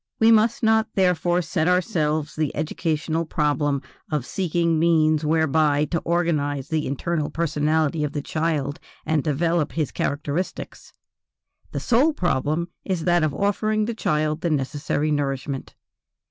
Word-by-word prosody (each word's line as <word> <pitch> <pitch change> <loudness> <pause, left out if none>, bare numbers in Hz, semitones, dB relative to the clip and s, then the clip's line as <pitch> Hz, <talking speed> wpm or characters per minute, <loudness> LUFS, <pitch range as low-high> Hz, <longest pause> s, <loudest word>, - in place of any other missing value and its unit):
We 225 +1 +6
must 225 +1 +3
not 220 0 +3
therefore 180 -1 +2
set 160 +1 -1
ourselves 155 -5 0
the 155 -3 -1
educational 160 +1 -1
problem 145 -3 0 0.3
of 150 -5 -1
seeking 170 -2 0
means 155 -2 +3
whereby 155 -1 +2
to 170 - +1
organize 150 -6 -1
the 155 -1 -1
internal 150 +3 -2
personality 155 -1 0
of 150 -1 -2
the 145 - -3
child 155 -3 -1 0.3
and 155 -2 +1
develop 165 +1 0
his 155 -3 -1
characteristics; 150 +5 -3 0.8
the - - -3
sole 265 +7 +3
problem 170 - 0
is 185 -4 -2
that 175 -1 +3
of 155 -2 0
offering 215 +3 +1
the 235 - -2
child 155 -6 0
the 170 - 0
necessary 145 +1 -1
nourishment. 140 -1 -3
155 Hz, 135 wpm, -23 LUFS, 150-175 Hz, 0.8 s, We